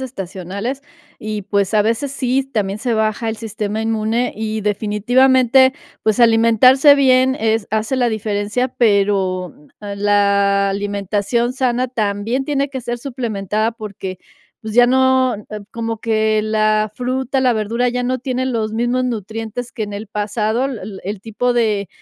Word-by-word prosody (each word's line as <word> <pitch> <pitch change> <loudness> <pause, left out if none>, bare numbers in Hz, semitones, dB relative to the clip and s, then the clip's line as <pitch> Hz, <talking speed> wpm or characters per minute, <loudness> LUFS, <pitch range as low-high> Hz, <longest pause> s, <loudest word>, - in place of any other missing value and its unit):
estacionales 200 +2 -5 0.4
y, 215 -1 -4
pues, 200 +1 0
a 210 - +5
veces 230 +6 -1
sí 260 -1 0
s 270 - -8
también 200 -2 -1
se 235 +2 -1
baja 220 +1 0
el 225 - -2
sistema 215 0 -4
inmune 225 +2 0
y, 220 0 -3
definitivamente, 245 +5 +3 0.3
pues, 220 +1 +1
alimentarse 235 +5 +6
bien 260 -1 +3
es 220 -1 0
hace 220 +4 -1
la 245 -2 +2
diferencia, 215 +3 -1
pero, 195 -6 +1
mm, 150 - -22 0.3
la 200 -1 +2
alimentación 205 +4 -1
sana 255 -1 0
también 220 +2 -1
tiene 280 -1 -1
que 265 -1 -5
ser 240 0 -4
suplementada, 225 -4 -2
porque, 200 -5 -7 0.4
pues, 220 -1 -7
ya 245 0 +6
no, 260 0 +3
eh, 210 0 -9 0.3
como 230 -1 -4
que 220 -1 +1
la 215 0 +1
fruta, 260 +2 -1
la 255 -1 +3
verdura 230 +3 0
ya 250 +1 -2
no 255 +1 -1
tienen 255 +1 -2
los 220 -2 -2
mismos 240 +3 0
nutrientes 225 +1 -5
que 220 - -4
en 205 -1 -5
el 205 +2 -6
pasado, 215 +3 -1
el 210 -7 -7
el 200 0 -4
tipo 230 +4 -1
de 215 -5 0
220 Hz, 155 wpm, -18 LUFS, 205-250 Hz, 0.4 s, alimentarse